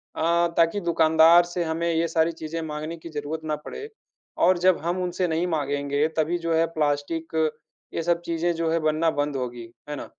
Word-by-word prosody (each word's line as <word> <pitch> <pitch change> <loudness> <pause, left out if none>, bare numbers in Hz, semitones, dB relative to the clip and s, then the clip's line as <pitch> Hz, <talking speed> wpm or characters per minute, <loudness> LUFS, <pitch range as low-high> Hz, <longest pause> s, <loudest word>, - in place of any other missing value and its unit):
अ, 170 +1 +2
ताकि 165 +4 +3
दुकानदार 165 0 +5
से 175 0 -3
हमें 165 +1 -1
ये 165 +1 +1
सारी 165 0 +1
चीज़ें 165 0 -6
माँगने 155 +2 -5
की 165 +1 -10
जरूरत 150 +1 -5
ना 155 -1 -1
पड़े 435 - -7 0.6
और 185 0 +4
जब 185 0 +4
हम 175 +2 -1
उनसे 180 0 -1
नहीं 165 +1 0
माँगेंगे 145 -1 0
तभी 160 +3 +1
जो 165 -1 -1
है 165 +1 +3
प्लास्टिक 155 +2 -1 0.6
ये 165 - -2
सब 170 0 +1
चीज़ें 170 +1 0
जो 165 0 -1
है 165 - +2
बनना 155 +1 +1
बंद 145 -1 -2
होंगी। 120 -2 -5 0.2
है 150 - -3
ना? - - -6
165 Hz, 195 wpm, -25 LUFS, 155-170 Hz, 0.6 s, दुकानदार